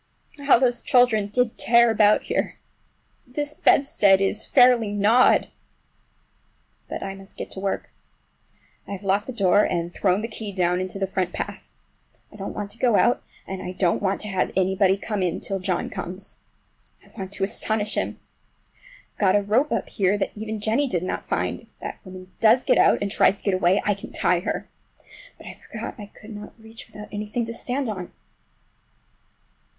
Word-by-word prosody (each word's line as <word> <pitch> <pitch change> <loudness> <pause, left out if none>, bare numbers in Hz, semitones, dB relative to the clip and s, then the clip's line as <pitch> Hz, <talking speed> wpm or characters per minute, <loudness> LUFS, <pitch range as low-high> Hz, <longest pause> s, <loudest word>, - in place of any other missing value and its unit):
How 280 -2 +5
those 245 -1 +1
children 240 -5 +3
did 240 +2 0
tear 235 0 +5
about 210 -1 +4
here! - - -2 0.7
This 290 +4 -3
bedstead 205 -11 +4
is 195 +3 -1
fairly 245 -5 +5
gnawed! 215 +5 +4 1.4
But - - -5
I 195 - -4
must 195 0 -13
get - - -6
to - - -7
work. 195 0 -3 1.0
I - - -5
have 195 0 -7
locked 200 +2 +1
the - - -4
door 205 -3 +3
and 170 0 -2
thrown 190 0 +1
the 225 - -3
key 215 -2 -7
down 180 -1 +1
into 185 +1 -4
the 195 - 0
front 185 -2 -2
path. - - -6 0.6
I - - -15
don't 200 -1 -6
want 205 -1 -4
to 225 - -7
go 240 -4 +3
out, 240 - +3 0.2
and 190 -1 -6
I 180 - -5
don't 180 -2 +1
want 195 -1 0
to 210 - -6
have 190 -2 0
anybody 190 +1 +3
come 210 0 -3
in, 180 -2 -1
till 195 -1 -3
John 185 -1 -1
comes. 185 +2 -7 0.7
I - - -21
want 190 -3 -6
to 195 - -2
astonish 210 +1 -1
him. - - -2 0.9
I've - - -33
got 195 -2 +4
a 205 - +3
rope 235 +9 +1
up 230 -4 -1
here 200 +1 +1
that 205 - -2
even 215 0 -5
Jennie 230 +7 +1
did 180 -8 -1
not 185 - -4
find. - - -1
If - - -23
that - - -7
woman 185 -1 -11
does 230 +3 +5
get - - +4
out, - - +4
and 200 - -2
tries 200 - +3
to - - -10
get 200 - +1
away, 185 +1 +3
I 205 - +3
can 200 - -10
tie 180 -1 +2
her! 180 - -3 0.7
But - - -15
I - - -7
forgot 270 - -8
I 205 - -8
could 215 +1 -12
not 210 0 -9
reach 225 +1 -12
far 210 - -12
without - - -14
anything 210 +3 -3
to 230 - -5
stand 255 +3 -3
on! 185 -5 -5
205 Hz, 190 wpm, -24 LUFS, 190-225 Hz, 1.4 s, How